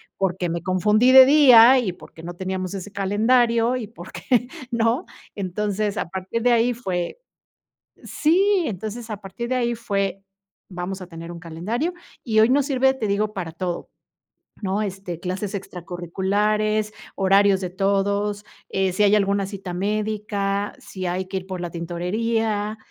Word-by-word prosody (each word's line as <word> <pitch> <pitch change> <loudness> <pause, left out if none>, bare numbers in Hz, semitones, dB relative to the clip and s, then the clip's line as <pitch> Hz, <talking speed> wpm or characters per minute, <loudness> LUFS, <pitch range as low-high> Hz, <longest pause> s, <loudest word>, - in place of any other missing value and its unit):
Porque 185 -2 -1
me 170 0 -3
confundí 210 +7 +3
de 260 0 +10
día, 260 -3 +8
y 215 -7 -1
porque 165 -2 -14
no 175 - -6
teníamos 185 0 -4
ese 195 +1 -7
calendario, 230 +4 +2
y 235 -5 -4
porque 235 +5 -2 0.2
¿no? 235 +7 +1 0.3
Entonces, 205 +2 -2
a - - -2
partir 190 +6 -4
de 245 -1 +4
ahí 235 +1 +3
fue 190 - -4 0.8
sí, 370 +4 +2
entonces, 220 +3 -5
a 210 - -4
partir 215 +5 -6
de 255 - 0
ahí 240 -2 0
fue: 195 -3 -2 0.4
"Vamos 185 +1 -5
a 185 - -7
tener 165 -1 -9
un 170 - -7
calendario". 190 - -3 0.3
Y 220 -3 +3
hoy 220 - +6
nos 275 +2 +3
sirve, 265 -1 +2
te 230 -5 -3
digo, 210 +1 0
para 180 -5 -5
todo, 175 +1 -4 0.7
¿no?, 200 +2 -1
este, 195 -4 -5
clases 185 +3 -4
extracurriculares, 200 +4 -1 0.2
horarios 195 0 +4
de 180 - -3
todos, 200 +2 0 0.2
eh, 190 -1 0
si 185 - +1
hay 205 0 +5
alguna 200 -1 +1
cita 195 -2 -7
médica, 205 +1 -2
si 185 -1 -7
hay 180 +1 -2
que 190 +1 -3
ir 185 - -10
por 185 -2 -5
la 175 - -4
tintorería, 210 +6 -2
200 Hz, 155 wpm, -23 LUFS, 185-225 Hz, 0.8 s, de